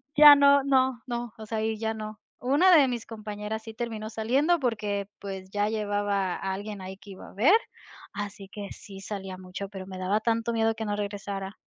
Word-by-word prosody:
ya 295 0 +11
no, 280 0 +6
no, 260 -3 +2
no, 240 -2 -4
o 220 - -8
sea, 220 0 -2
y 220 0 -1
ya 220 0 -1
no. 215 0 -7 0.2
Una 300 +9 +5
de 285 -4 +6
mis 240 -2 -3
compañeras 215 0 -5
sí 225 - -8
terminó 220 -2 -4
saliendo 265 +10 +2
porque, 210 -6 -1
pues, 190 -1 -7
ya 205 +1 +1
llevaba 205 -3 0
a 190 0 -3
alguien 205 0 -6
ahí 190 +1 -7
que 200 +1 -13
iba 190 - -11
a - - -16
ver, 270 - +5 0.6
así 200 -1 -6
que 200 0 -7
sí 195 -1 -10
salía 195 -2 -6
mucho, 185 +2 -7
pero 190 -2 -8
me 190 - -7
daba 185 +3 +1
tanto 230 +1 0
miedo 225 0 +2
que 220 - -4
no 205 -1 -1
regresara. 200 -1 -4
215 Hz, 205 wpm, -27 LUFS, 200-235 Hz, 0.6 s, ya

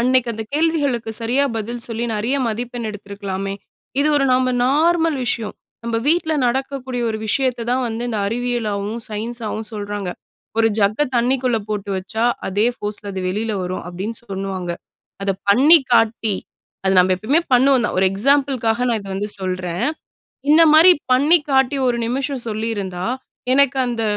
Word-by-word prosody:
அன்னக்கி 250 0 +3
அந்த 220 0 -5
கேள்விகளுக்கு 290 -8 0
சரியா 250 +5 +1
பதில் 235 +2 -3
சொல்லி 230 0 -3
நிறைய 230 +6 0
மதிப்பெண் 235 +1 -4
எடுத்திருக்கலாமே!" 200 -1 -5 0.5
இது 300 - +3
ஒரு 275 - +3
நம்ம 255 0 +2 0.2
நார்மல் 320 +2 +2
விஷயம். 230 -3 -2 0.3
நம்ம 230 -1 -1
வீட்ல 320 -1 +2
நடக்கக்கூடிய 260 0 -2
ஒரு 220 - -3
விஷயத்த 250 +1 0
தான் 255 +1 +1
வந்து 225 +1 -4
இந்த 220 -3 -2
அறிவியலாவும், 225 -2 -2
சயின்ஸாவும் 220 0 -4
சொல்றாங்க. 205 -3 -4 0.5
ஒரு 225 0 +4
ஜக்க 205 +4 +2 0.2
தண்ணிக்குள்ள 245 -1 +1
போட்டு 205 -1 -3
வச்சா, 220 +5 -2 0.2
அதே 205 +4 +1
ஃபோர்ஸ்ல 205 -1 -5
அது 190 - -4
வெளில 215 +4 -2
வரும் 180 +1 -4
அப்பிடின்னு 195 +6 -4
சொல்லுவாங்க. 190 -3 -4 0.5
அத 195 - 0 0.2
பண்ணி 285 +11 +7
காட்டி, 225 -2 +2 0.5
அத 190 - +3
நம்ம 185 +1 +5
எப்பமே 265 - +1
பண்ணுவோம் 260 -1 +4
தான். - - -3
ஒரு 190 - +4
எக்ஸாம்பிள் 275 +6 +2
காக 235 +3 +2
நான் 230 -3 0
இத 200 - -10
வந்து 205 +2 -2
சொல்றேன். 185 -2 -2 0.7
இந்த 320 +2 +7
மாதிரி 330 +4 +9 0.2
பண்ணி 290 +7 +5
காட்டி 265 +1 +3
ஒரு 240 -1 +1
நிமிஷம் 260 +1 -2
சொல்லியிருந்தா, 205 -5 -3 0.5
எனக்கு 275 0 +3
அந்த 235 -2 -2
230 Hz, 150 wpm, -20 LUFS, 205-260 Hz, 0.7 s, மாதிரி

